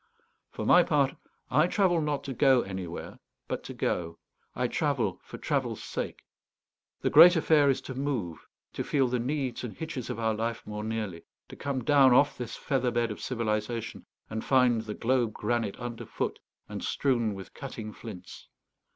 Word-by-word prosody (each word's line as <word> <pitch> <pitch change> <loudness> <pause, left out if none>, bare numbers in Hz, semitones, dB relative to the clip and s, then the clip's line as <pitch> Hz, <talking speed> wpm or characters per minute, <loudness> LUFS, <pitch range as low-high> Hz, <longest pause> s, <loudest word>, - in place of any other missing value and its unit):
For - - -5
my 180 - +7
part, 145 -6 +2 0.4
I 155 +6 +4
travel 180 -3 +2
not 150 -2 -1
to 135 - -4
go 130 0 +5
anywhere, 95 -3 -6 0.3
but - - -3
to - - -6
go. 85 -1 -2 0.4
I 125 0 0
travel 130 - 0
for - - -9
travel's - - -2
sake. - - -5 0.8
The - - 0
great 175 +1 +9
affair 155 -3 +4
is 135 - +1
to 130 - -7
move; 125 - -3 0.3
to - - -3
feel 135 -3 +2
the 125 0 0
needs 130 0 -2
and 120 - -6
hitches 155 -7 -5
of - - -3
our 115 -1 +1
life 115 +1 -3
more 105 0 -5
nearly; 110 -6 -4 0.2
to - - -9
come 140 -2 -3
down 140 -4 +6
off 145 +3 +4
this 120 -2 -6
feather 130 -3 0
bed 120 -1 0
of 105 - -7
civilization, 115 -1 -3 0.2
and 110 0 -4
find 125 -4 +4
the 105 -1 -6
globe 120 -2 +1
granite 110 -2 -1
underfoot 120 -2 -4 0.3
and - - -6
strewn 120 -6 +1
with 95 -1 -10
cutting 115 -6 -7
flints. 95 -6 -10
120 Hz, 170 wpm, -29 LUFS, 110-140 Hz, 0.8 s, great